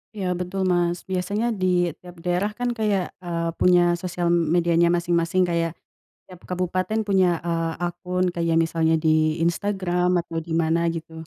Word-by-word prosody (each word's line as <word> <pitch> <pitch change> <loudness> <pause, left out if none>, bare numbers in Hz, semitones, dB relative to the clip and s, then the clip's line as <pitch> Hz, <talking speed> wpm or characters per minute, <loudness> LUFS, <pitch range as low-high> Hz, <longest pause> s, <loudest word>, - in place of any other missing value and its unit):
Iya, 190 -3 -3
betul, 180 +2 -4
Mas, 175 -1 0
biasanya 200 +5 -1
di 175 -3 +2
tiap 180 -1 -13
daerah 180 +4 +1
kan 245 0 -1
kayak, 210 -5 -1
eee, 170 -1 -2
punya 175 -1 +5
sosial 175 -1 -1
medianya 170 0 +3
masing-masing 170 +1 +1
kayak 170 -1 -1 0.5
tiap 180 - -14
kabupaten 185 +4 -1
punya, 190 -3 +3 0.2
eee, 165 -1 -1
akun 180 +1 -1
kayak 170 -1 -1
misalnya 165 0 +2
di 155 0 +2
Instagram 180 -1 0
atau 165 -1 -6
di 160 0 -4
mana 165 +1 +1
gitu. 160 0 -8
175 Hz, 150 wpm, -23 LUFS, 165-185 Hz, 0.5 s, punya